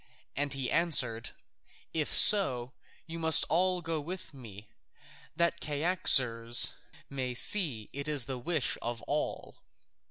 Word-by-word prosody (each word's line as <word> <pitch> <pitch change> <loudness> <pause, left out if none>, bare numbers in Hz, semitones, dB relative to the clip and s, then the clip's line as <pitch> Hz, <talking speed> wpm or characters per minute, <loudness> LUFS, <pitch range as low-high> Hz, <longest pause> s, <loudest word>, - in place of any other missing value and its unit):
And 145 +1 -2
he 135 -2 -4
answered, 125 -9 0 0.6
"If 155 -2 -3
so, 130 -12 +4 0.3
you 165 0 -8
must 160 -1 +5
all 180 +1 0
go 165 -1 -3
with 180 +2 -9
me, 110 -6 -13 0.7
that 170 0 -1
Cyaxares 135 -7 +1 0.3
may 130 -2 -5
see 135 - +3
it 140 +2 -6
is 145 -5 -1
the 130 -1 -6
wish 155 0 -1
of 120 -1 -6
all." - - -5
140 Hz, 125 wpm, -29 LUFS, 120-165 Hz, 0.7 s, must